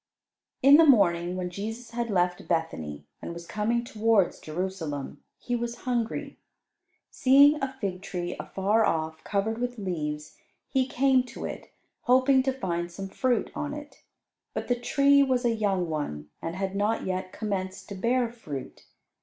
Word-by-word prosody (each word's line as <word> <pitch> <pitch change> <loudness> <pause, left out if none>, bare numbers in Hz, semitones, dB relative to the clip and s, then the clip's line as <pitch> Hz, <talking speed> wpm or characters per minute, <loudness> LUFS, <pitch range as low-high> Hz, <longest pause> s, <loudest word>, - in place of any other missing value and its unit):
In 280 +2 +9
the 330 - +7
morning, 180 - +4
when 180 -1 -3
Jesus 225 +5 -6
had 235 0 -2
left 180 -2 0
Bethany 80 - -2 0.2
and - - -5
was 170 0 -8
coming 225 +5 0
towards 225 -4 +2
Jerusalem, 160 -4 -4
He 245 - -3
was 240 0 -4
hungry. 250 +4 -2 0.7
Seeing 280 +3 +6
a 270 -1 -1
fig 185 -4 -3
tree 175 -2 -4
afar 205 +4 +1
off, 160 -3 -1
covered 215 +3 -1
with 245 0 -2
leaves, 150 -6 -4 0.3
He 260 -1 +1
came 265 0 +3
to 245 - -7
it, - - -7 0.3
hoping 260 +1 +4
to 265 +1 +1
find 175 -9 -3
some 195 +2 -6
fruit 245 +3 0
on 295 -1 -3
it. 295 0 -10 0.5
But - - -3
the 245 - +3
tree 280 +3 +4
was 260 -2 +2
a 235 - +3
young 195 -5 0
one, 75 - -4
and 165 +1 -4
had 190 0 -3
not 210 +3 0
yet 185 0 -3
commenced 190 -3 -4
to - - -5
bear 240 +5 +1
fruit. 150 - -8
210 Hz, 160 wpm, -27 LUFS, 175-245 Hz, 0.7 s, In